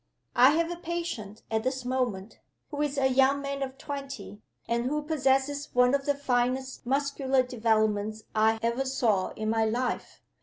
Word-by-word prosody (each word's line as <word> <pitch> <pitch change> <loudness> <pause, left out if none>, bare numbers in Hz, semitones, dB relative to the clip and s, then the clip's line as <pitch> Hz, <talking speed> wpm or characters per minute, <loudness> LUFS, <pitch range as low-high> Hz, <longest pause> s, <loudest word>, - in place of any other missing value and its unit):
I 260 +4 +7
have 335 +1 +1
a 345 - -4
patient 335 - -5
at 220 0 +1
this 255 +1 -2
moment, 245 -6 -2 0.3
who 290 -1 -3
is 290 -1 -1
a 270 - +2
young 265 +1 +4
man 280 0 -4
of 265 0 -4
twenty, 275 -7 -7 0.3
and 235 +1 0
who 300 +3 -1
possesses 285 -1 +1
one 250 +1 +5
of 280 0 0
the 285 - +2
finest 260 -1 -1
muscular 270 -1 +1
developments 220 -3 0
I 220 +1 +3
ever 235 +3 +1
saw 225 -8 +1
in 215 0 -2
my 225 0 +2
life. 240 +3 -2
260 Hz, 165 wpm, -28 LUFS, 225-280 Hz, 0.3 s, I